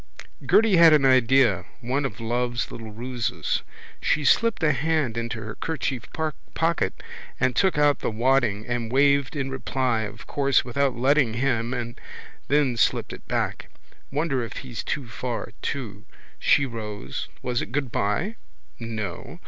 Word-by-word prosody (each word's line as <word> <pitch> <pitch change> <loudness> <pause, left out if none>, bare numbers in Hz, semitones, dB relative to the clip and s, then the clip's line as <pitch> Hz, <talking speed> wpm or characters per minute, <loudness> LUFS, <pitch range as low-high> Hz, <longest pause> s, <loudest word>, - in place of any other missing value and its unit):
Gerty 215 -4 +4
had 165 -2 +8
an 145 -3 +5
idea, 130 -6 +4 0.2
one 135 +3 -1
of 135 - -4
love's 120 +1 -1
little 115 -1 -7
ruses. 120 +2 -2 0.4
She 150 -1 +1
slipped 230 +5 +3
a 155 - +5
hand 150 -3 0
into 115 -1 -3
her 105 0 -6
kerchief 135 -5 -3 0.5
pocket 165 - 0 0.4
and 125 -1 +1
took 190 +1 +3
out 145 -1 +4
the - - -1
wadding 115 -2 +1
and 120 -2 -3
waved 140 +1 +3
in 135 -2 -2
reply 130 -3 0
of 105 - -7
course 140 -4 +2
without 130 +1 0
letting 130 -2 +3
him 120 -2 0
and 120 -2 -4 0.5
then 140 -4 +2
slipped - - +1
it - - -12
back. - - -2 0.4
Wonder 140 -2 0
if 115 - -6
he's 120 -3 -5
too 140 -4 -3
far 120 0 -4
to. 105 -7 -4 0.4
She 140 - +4
rose. 105 - -5 0.2
Was 125 -1 -1
it - - -6
goodbye? 135 - -1 0.4
No. 110 - -5
125 Hz, 150 wpm, -25 LUFS, 115-140 Hz, 0.5 s, had